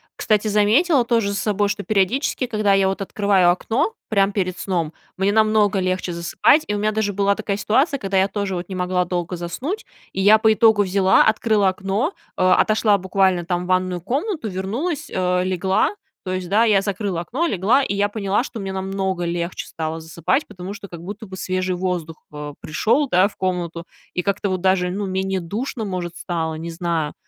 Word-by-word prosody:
кстати, 215 0 +1
заметила 240 - +3
тоже 230 -3 +1
за 200 - -2
собой, 205 -1 +1
что 205 0 -3
периодически, 220 +6 0
когда 215 -4 +1
я 195 -1 +3
вот 195 +1 -2
открываю 195 -2 +2
окно 250 - 0
прям 200 -2 +2
перед 185 -3 -2
сном, 170 -5 -2 0.2
мне 195 +2 +2
намного 215 -2 +3
легче 185 -1 -1
засыпать. 170 - +3
И 210 - -1
у - - -1
меня 210 +1 +1
даже 215 -1 0
была 200 +1 +2
такая 205 -2 -3
ситуация, 270 +8 +2
когда 195 -4 -2
я 190 +1 +4
тоже 200 -2 -3
вот 175 +1 -5
не 190 - -5
могла 180 0 0
долго 175 0 -3
заснуть, 250 - -4 0.3
и 190 - -2
я 210 +2 +7
по 220 0 +4
итогу 220 -2 +4
взяла, 190 0 +4
открыла 215 -2 +3
окно, 200 - -1 0.2
э, - - -2
отошла 210 +3 +4
буквально 190 -1 +1
там 175 0 -1
в - - -8
ванную 185 -1 +1
комнату, 285 - -2
вернулась, 225 - -3
э, 180 -1 0
легла. 190 - +1 0.3
То 185 - -3
есть, 185 -1 -4
да, 215 +3 +4
я 210 -4 +4
закрыла 195 -3 -2
окно, 265 - -2
легла, 245 - +2
и 230 - -2
я 205 +1 +1
поняла, 205 +1 0
что 235 -4 -7
мне 195 -1 -4
намного 190 -1 -2
легче 170 +1 -3
стало 160 0 -4
засыпать, 170 - -1
потому 190 -1 -7
что 200 -1 -9
как 170 -2 -10
будто 205 +4 -7
бы 190 0 -9
свежий 185 0 -1
воздух, 175 -3 -4
э, 150 0 -6
пришёл, 225 - +1
да, 185 +2 +4
в 205 - -13
комнату, 175 -2 -2 0.3
и 180 - -1
как-то 200 0 -1
вот 185 -1 -1
даже, 185 -1 +2
ну, 200 +3 -3
менее 190 0 -1
душно, 220 +6 -4
может, 180 -3 -4
стало, 160 -2 -3
не 165 +2 -6
знаю. 165 -3 -2
195 Hz, 200 wpm, -21 LUFS, 180-215 Hz, 0.3 s, я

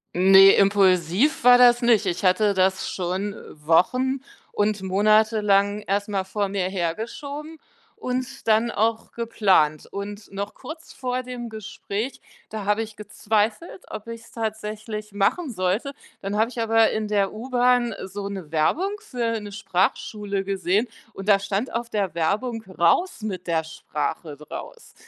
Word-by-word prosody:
Ne, 195 +2 +8
impulsiv 195 - +3
war 245 0 +8
das 245 0 +6
nicht. 235 -3 +3
Ich 180 +1 -2
hatte 200 +2 +3
das 190 0 +1
schon 190 +3 -3 0.2
wochen 250 - +1 0.3
und 205 -1 0
monatelang 210 +1 +3
erst 205 0 -1
mal 195 -2 -1
vor 200 +2 -2
mir 190 -2 -2
hergeschoben 260 - -5 0.4
und 255 +1 -4
dann 220 +2 +3
auch 225 +2 -1
geplant. 195 -10 +2
Und 205 +1 -7
noch 200 +1 -5
kurz 315 +1 -10
vor 255 0 -3
dem 245 -1 -6
Gespräch, 215 +2 -5 0.3
da 215 -1 -5
habe 210 +2 +1
ich 220 -1 -10
gezweifelt, 215 - -2
ob 215 +1 -8
ich's 230 0 -9
tatsächlich 215 -1 -5
machen 215 - 0
sollte. 195 +6 -1 0.3
Dann 200 +1 -3
habe 220 +2 +2
ich 245 -1 -5
aber 225 0 +3
in 215 -1 -2
der 200 -2 0
U-Bahn 245 0 +1
so 200 +1 -6
'ne 190 -6 -7
Werbung 295 - +1
für 240 - -2
'ne 205 -1 -8
Sprachschule 200 0 -1
gesehen 195 +3 0 0.3
und 195 - -8
da 200 -2 +5
stand 200 +5 -3
auf 235 0 -3
der 200 -7 -1
Werbung 220 +8 -1
„Raus 185 - +1
mit 185 -4 -4
der 165 -1 +1
Sprache“ 155 -1 -5
draus 465 - -10
210 Hz, 145 wpm, -24 LUFS, 195-230 Hz, 0.4 s, Ne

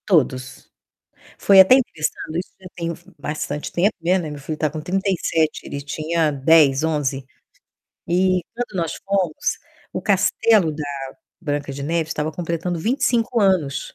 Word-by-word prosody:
Todos. 130 -8 0 0.7
Foi 195 -1 +6
até 190 +7 +9
interessante, 165 -8 -2
isso 180 - -8
já 190 - -11
tem 170 -1 -3
f 170 - -11
bastante 150 0 -4
tempo, 190 +5 +2
né. 180 +3 +2
Meu 150 -4 -6
filho 155 +2 -5
tá 155 - 0
com 155 +1 -6
37, 180 -3 0
ele 140 - -5
tinha 155 +2 -1
10, 145 0 +4
11. 145 -4 -1 0.8
E 185 +1 +2
quando 240 -4 -4
nós 165 - -2
fomos, 190 -5 0 0.4
o - - -3
castelo 195 -1 +3
da 150 0 -5 0.6
Branca 145 -3 -3
de 140 +1 -6
Neve 160 +2 -1
estava 155 0 -2
completando 170 +1 -3
25 240 - +1
anos. 185 -9 +1
165 Hz, 145 wpm, -21 LUFS, 150-190 Hz, 0.8 s, até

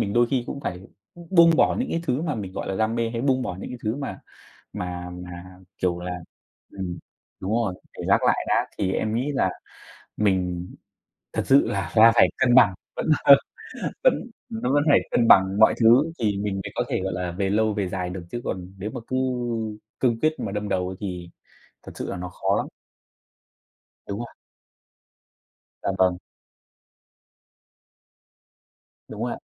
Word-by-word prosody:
mình 100 - -1
đôi 120 +1 +4
khi 130 -3 +1
cũng 140 - -5
phải 90 -8 -4 0.5
buông 170 -2 +7
bỏ - - +3
những 255 - -1
cái 165 - -1
thứ 135 -2 -1
mà 160 -3 -1
mình, 100 -4 -5
gọi - - -5
là, 95 - -1
đam 110 +2 +1
mê 115 -1 0
hay 115 0 -3
buông 130 0 +2
bỏ 90 - -4
những - - -7
cái 125 - -7
thứ 110 +5 0
mà 140 - -5 0.5
mà 90 0 -5
mà, 90 0 -8 0.5
kiểu 90 -1 0
là 90 0 -5 0.6
ừm, 90 -3 -5 0.4
đúng 95 - -4
rồi, 110 -4 +1 0.2
để - - -7
gác - - +4
lại - - +2
đã. - - +2
Thì 95 -1 0
em 110 +3 -1
nghĩ 135 +5 -1
là 140 - +1 0.7
mình 90 -4 0 0.7
thật - - -1
sự 135 +1 +5
là 95 -5 -3
là 115 +1 +8
phải - - +6
cân 120 -2 +3
bằng, 110 -7 +7 0.2
vẫn, - - -3 0.2
ờ, 140 -1 +10 0.7
vẫn - - +6 0.4
nó 225 - -2
vẫn 145 0 +4
phải 145 - +7
cân 115 -1 +2
bằng 95 +1 +6
mọi 110 - +6
thứ 125 +8 +5
thì 105 -4 0
mình 100 -1 -2
mới 95 -1 -5
có - - 0
thể, - - -1
gọi 95 - -2
là, 90 0 -3
về 95 +2 -1
lâu, 110 +1 +2
về 100 -3 -1
dài 90 -1 -3
được, 90 -1 -6
chứ 120 - -4
còn 90 0 -5
nếu 105 +3 -4
mà 125 - -6
cứ 130 - -1 0.8
cương 120 -3 +1
quyết 155 - +3
mà 100 - -3
đâm 105 0 -3
đầu 90 -1 0
ấy 95 - -6
thì 90 -4 -5 0.5
thật - - -10
sự - - -4
là - - -4
nó 90 0 -5
khó 95 +2 0
lắm. - - -1 1.4
Đúng 100 +1 -5
rồi. 120 - -4 1.6
Dạ - - 0
vâng. 90 -1 +3 2.9
Đúng - - -6
rồi - - -1
ạ. - - -7
105 Hz, 190 wpm, -24 LUFS, 90-120 Hz, 2.9 s, ờ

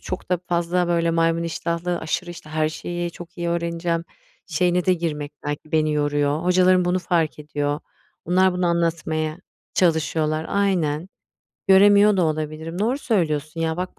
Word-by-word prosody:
çok 185 - -6
da 180 - +2
fazla, 175 +1 +1
böyle, 170 -1 +2
maymun 165 0 +1
iştahlı 170 +1 -2
aşırı, 175 +3 -3
işte, 165 -3 -11
her 155 0 +1
şeyi 175 +2 -4
çok 175 +2 -12
iyi 170 0 -1
öğreneceğim 170 0 -1 0.4
şeyine 180 +2 +1
de 185 - +5
girmek 150 -4 -3
belki 145 +1 -5
beni 155 -1 +2
yoruyor. 145 +1 0
Hocalarım 180 0 +4
bunu 180 +1 +1
fark 165 -4 0
ediyor. 145 -1 -2 0.4
Onlar 185 +2 +3
bunu 180 0 0
anlatmaya 165 -2 -1 0.4
çalışıyorlar. 160 -2 +1
Aynen. 180 -5 0 0.6
Göremiyor 205 +1 +6
da 180 - +3
olabilirim. 155 +2 -3
Doğru 235 +7 +1
söylüyorsun 160 - -1
ya. 160 0 0
Bak 180 +1 -5
170 Hz, 150 wpm, -23 LUFS, 155-180 Hz, 0.6 s, Göremiyor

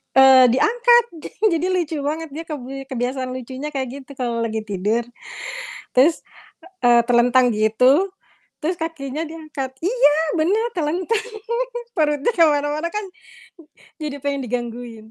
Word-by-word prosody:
eee, 265 -1 +8
diangkat 480 - +4 0.2
jadi - - -10 0.2
jadi 360 - -1
lucu 330 -3 -1
banget 310 +3 -3
dia 320 +3 -6
kebi 270 -2 -7
kebiasaan 255 0 -3
lucunya 260 +3 -6
kayak 265 -1 -1
gitu 280 0 -10
kalo 240 -3 -2
lagi 220 -1 -2
tidur. 210 +3 -1 0.9
Terus, 295 +6 +5 0.6
eee, 240 -1 +6
telentang 245 +1 +4
gitu, 250 - +3 0.5
terus 335 +3 -1
kakinya 320 -2 -4
diangkat 310 -4 -6
iya, 370 -5 +3 0.2
bener, 390 +8 +2
telentang, 360 +8 -1 0.7
perutnya 295 +2 +2
ke 335 - +7
mana-mana 295 +1 0
kan, 425 -1 -3 0.9
jadi 285 -3 -5
pengen 280 -2 -2
digangguin. 235 -2 -5
280 Hz, 125 wpm, -21 LUFS, 250-325 Hz, 0.9 s, eee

